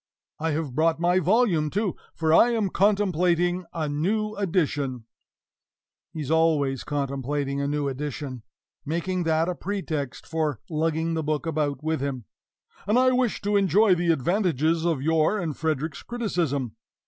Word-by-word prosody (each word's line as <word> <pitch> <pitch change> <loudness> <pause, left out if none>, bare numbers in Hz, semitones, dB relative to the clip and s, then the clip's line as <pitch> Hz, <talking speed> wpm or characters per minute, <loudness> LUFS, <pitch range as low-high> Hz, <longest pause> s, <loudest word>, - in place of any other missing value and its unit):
I 160 +1 -1
have 150 -4 -3
brought 160 +3 +2
my 175 +2 +3
volume, 185 -4 +2
too, 200 +2 -1 0.2
for 160 -1 +1
I 235 - +6
am 220 -5 0
contemplating 180 -3 +2
a 160 -2 -2
new 205 +9 -1
edition" 145 - -1 1.1
(he 160 -2 -5
is 145 - -4
always 155 -5 +2
contemplating 140 0 -2
a 140 - -1
new 145 0 -1
edition, 135 -2 -5 0.4
making 170 +3 -2
that 160 +1 +2
a 180 - 0
pretext 165 -8 -4
for 155 -5 -1
lugging 160 +1 0
the 160 - -1
book 155 +1 -2
about 150 -2 -1
with 160 -3 -1
him), 135 -5 -3 0.6
"and 210 +4 +3
I 255 0 +5
wish 250 -4 0
to 205 +1 +1
enjoy 200 +1 +4
the 175 -1 +2
advantages 165 - +1
of 160 -6 0
your 160 +5 +2
and 165 -7 -3
Frederick's 155 -1 -2
criticism. 160 - -2
160 Hz, 150 wpm, -25 LUFS, 145-185 Hz, 1.1 s, I